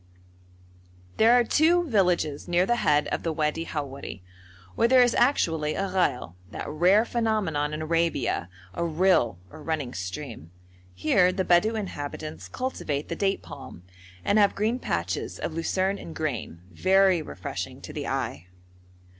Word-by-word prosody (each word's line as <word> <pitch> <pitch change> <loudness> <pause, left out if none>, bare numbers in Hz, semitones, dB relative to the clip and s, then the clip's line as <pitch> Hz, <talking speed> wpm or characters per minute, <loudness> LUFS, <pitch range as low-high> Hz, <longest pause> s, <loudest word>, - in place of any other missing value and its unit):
There 225 +2 +6
are 245 0 +5
two 330 +8 +3
villages 180 - +1
near 175 +1 +3
the 240 +3 +1
head 150 -8 +2
of - - -2
the 165 - -1
Wadi 155 +1 -1
Howeri, 140 - -6 0.5
where 230 - +3
there 255 0 +6
is 245 - +2
actually 165 - +2
a 195 0 -1
ghail 180 - 0 0.2
that - - -6
rare 180 +8 +4
phenomenon 210 -12 0
in 155 +1 -4
Arabia, 165 - 0 0.2
a 170 - -2
rill 165 - +2
or 155 - -11
running 150 -5 -3
stream. 95 - -6 0.5
Here 180 - +3
the 190 0 -2
Bedou 180 +6 +3
inhabitants 155 -6 -5
cultivate 155 - -3
the 170 - -2
date 195 +1 0
palm, 85 - -10 0.4
and 210 - +3
have 205 -1 +4
green 225 +5 0
patches 90 - -3
of - - -4
lucerne 190 +4 0
and 165 - -9
grain, 120 - -4
very 190 - +3
refreshing 70 - -6
to - - -9
the - - -4
eye. 85 +4 -3
170 Hz, 150 wpm, -26 LUFS, 150-200 Hz, 0.5 s, There